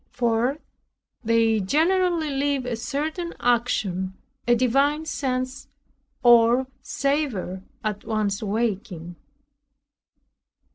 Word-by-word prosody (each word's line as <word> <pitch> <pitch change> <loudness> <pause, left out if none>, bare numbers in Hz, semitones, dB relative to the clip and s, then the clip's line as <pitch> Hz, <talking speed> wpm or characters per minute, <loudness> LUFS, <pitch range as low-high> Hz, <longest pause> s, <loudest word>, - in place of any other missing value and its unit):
4. 240 +3 +1 0.7
They 225 -1 +3
generally 330 - +2
leave 275 -1 0
a 245 -1 -2
certain 310 +8 -3
unction, 200 -6 0 0.3
a 240 - +5
divine 275 +6 +2
sense 255 -3 -3 0.6
or 240 +1 +6 0.2
savor 275 -10 -1 0.2
at 210 -2 -3
one's 210 -3 -1
waking. 200 -5 -2
240 Hz, 85 wpm, -24 LUFS, 215-280 Hz, 0.7 s, or